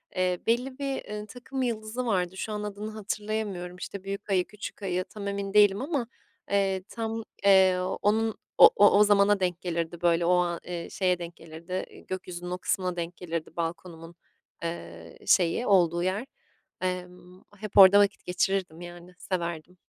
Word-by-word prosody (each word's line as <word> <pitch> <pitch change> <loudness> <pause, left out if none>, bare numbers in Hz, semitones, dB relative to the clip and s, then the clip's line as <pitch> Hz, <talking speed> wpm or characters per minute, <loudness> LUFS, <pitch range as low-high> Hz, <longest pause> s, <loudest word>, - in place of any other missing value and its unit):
eee, 180 -1 +1
belli 255 +4 0
bir, 275 -1 -3
ııı, 210 0 -5
takım 255 +4 -6
yıldızı 230 0 -2
vardı. 185 -4 0
Şu 215 - -4
an 210 0 -3
adını 210 +1 -5
hatırlayamıyorum, 210 -3 -4
işte, 190 +1 -7
büyük 200 +1 -6
ayı, 185 -2 +2
küçük 210 0 -9
ayı 185 -1 -1
tam 200 +1 -8
emin 200 0 -3
değilim 205 0 +5
ama, 275 -4 -2 0.4
eee, 195 -2 +1
tam, 225 -1 -4 0.2
eee, 190 -2 +6 0.2
onun 220 +1 +1 0.2
o - - +10
o 205 0 +6
o - - +8
zamana 205 0 +4
denk 180 -2 -1
gelirdi, 170 -1 -3
böyle, 170 -1 +3
ooo, 180 +1 +4
aaa, 175 0 -5
şeye 180 -2 0
denk 170 0 -7
gelirdi, 165 +3 -6
iii, - - -16
gökyüzünün 180 -1 -6
o 180 - -2
kısmına 180 0 -1
denk 170 0 -4
gelirdi 165 -2 -5
balkonumun, 165 0 -5 0.5
eee, 85 - -7
şeyi 180 +7 +3
olduğu 175 -3 +3
yer. 190 +6 -1 0.6
Emm, 180 0 -5 0.2
hep 210 0 -7
orada 195 +1 +10
vakit 205 -1 +2
geçirirdim, 180 -2 -1
yani, 175 +1 -10
severdim. 175 -1 -4
185 Hz, 165 wpm, -27 LUFS, 175-210 Hz, 0.6 s, o